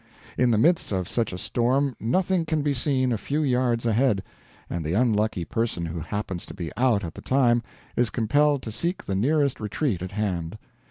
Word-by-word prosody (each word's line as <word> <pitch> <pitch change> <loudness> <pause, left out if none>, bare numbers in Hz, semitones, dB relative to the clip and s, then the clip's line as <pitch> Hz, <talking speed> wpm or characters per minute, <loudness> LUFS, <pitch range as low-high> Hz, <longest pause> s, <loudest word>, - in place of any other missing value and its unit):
In 125 - +3
the 115 - +3
midst 160 +6 +3
of 95 -3 -1
such 115 -3 -1
a 90 - -5
storm 130 +6 +1
nothing 180 - +1
can 155 -2 0
be 145 -1 +1
seen 130 -1 +1
a 110 - -2
few 150 +7 -1
yards 125 -3 +1
ahead, 115 -3 +2 0.4
and 85 -1 -3
the 80 +2 -2
unlucky 105 -5 +1
person 115 -6 -1
who 85 +1 -4
happens 95 +1 -4
to - - -9
be 85 -4 -5
out 120 -3 +2
at 80 -2 -5
the - - -10
time 120 -3 +3 0.3
is 120 -2 +2
compelled 145 +5 +2
to 110 - -5
seek 170 - -2
the 100 - -2
nearest 140 +7 +1
retreat 105 - -1
at 95 +2 -5
hand. 95 -3 -2
115 Hz, 200 wpm, -25 LUFS, 100-135 Hz, 0.4 s, In